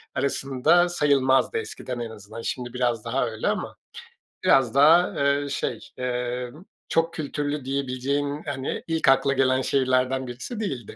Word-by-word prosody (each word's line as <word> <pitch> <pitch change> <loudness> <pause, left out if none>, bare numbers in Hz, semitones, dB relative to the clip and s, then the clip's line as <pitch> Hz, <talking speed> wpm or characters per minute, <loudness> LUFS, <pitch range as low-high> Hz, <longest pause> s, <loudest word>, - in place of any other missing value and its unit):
arasında 140 +6 +2
sayılmazdı, 140 - +2
eskiden 130 - -5
en 115 -1 -4
azından. 110 +1 -10
Şimdi 120 +1 -4
biraz 120 -3 -1
daha 125 +4 0
öyle 110 0 -4
ama - - -2 0.7
biraz 130 -3 +4
daha, 160 +6 +6
eee, 140 0 +1
şey, - - -2 0.2
eee, 125 0 -3 0.4
çok 165 +1 +1
kültürlü 145 -2 -3
diyebileceğin, 140 +2 -2
hani, 135 -2 -4
ilk 160 -3 0
akla 140 +1 +4
gelen 130 -1 +2
şehirlerden 130 0 +1
birisi 130 - -6
değildi. 130 - -4
135 Hz, 135 wpm, -25 LUFS, 125-145 Hz, 0.7 s, daha